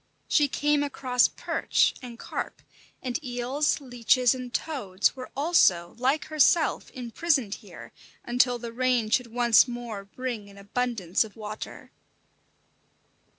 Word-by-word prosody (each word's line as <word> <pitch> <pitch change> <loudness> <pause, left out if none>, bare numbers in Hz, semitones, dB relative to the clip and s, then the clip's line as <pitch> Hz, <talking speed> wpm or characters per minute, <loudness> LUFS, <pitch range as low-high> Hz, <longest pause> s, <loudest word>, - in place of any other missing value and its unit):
She 295 - +3
came 295 +1 +1
across 255 -3 +2
perch - - +1
and 240 -2 -9
carp; - - -6 0.4
and 255 +4 -3
eels, 255 +5 0
leeches 245 -1 +2
and 255 -1 -7
toads 210 -11 -1
were 255 -1 -8
also, 190 - +3
like 270 +5 +1
herself, 310 +1 +2
imprisoned 255 -1 -1
here, - - -12 0.3
until 245 0 +2
the 235 -1 -7
rain 245 -3 +1
should 250 +1 +2
once 240 0 +5
more 240 -5 -6
bring 225 -1 -5
an 200 - -15
abundance 200 -3 -1
of 215 -3 -12
water. 215 0 -8
245 Hz, 125 wpm, -27 LUFS, 225-265 Hz, 0.4 s, once